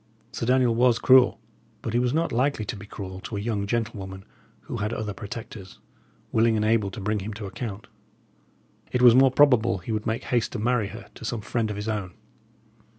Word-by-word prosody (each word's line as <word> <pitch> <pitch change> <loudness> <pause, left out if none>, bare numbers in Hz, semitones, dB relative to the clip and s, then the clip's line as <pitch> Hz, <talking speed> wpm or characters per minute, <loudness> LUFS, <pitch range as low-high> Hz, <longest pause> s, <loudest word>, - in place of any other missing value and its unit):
Sir 115 - -4
Daniel 125 -2 +3
was 120 0 +3
cruel, 130 -2 +5 0.4
but 115 - -3
he 120 - +3
was 125 0 +1
not 165 +4 0
likely 125 -2 0
to - - -4
be 105 0 -10
cruel 95 -2 -7
to 105 +2 -6
a - - -2
young 100 -1 -2
gentlewoman 100 -4 -3 0.4
who - - -6
had 105 +2 -2
other 105 -2 -3
protectors, 100 -2 -8 0.5
willing 115 0 +3
and 105 0 +1
able 110 -2 +2
to 95 - -8
bring 105 +1 -1
him 100 +2 -6
to 105 -1 -6
account. 100 0 -6 1.1
It 125 0 +1
was 120 -2 +9
more 135 +2 +6
probable 125 -6 +4
he 90 +6 -7
would 110 0 -2
make 110 +1 -1
haste 120 -3 0
to - - -3
marry 115 -1 +1
her 110 +4 -10
to - - -12
some 115 0 -3
friend 110 +1 -1
of 105 - -3
his 105 +1 -5
own. 105 -5 -3
110 Hz, 210 wpm, -25 LUFS, 105-120 Hz, 1.1 s, was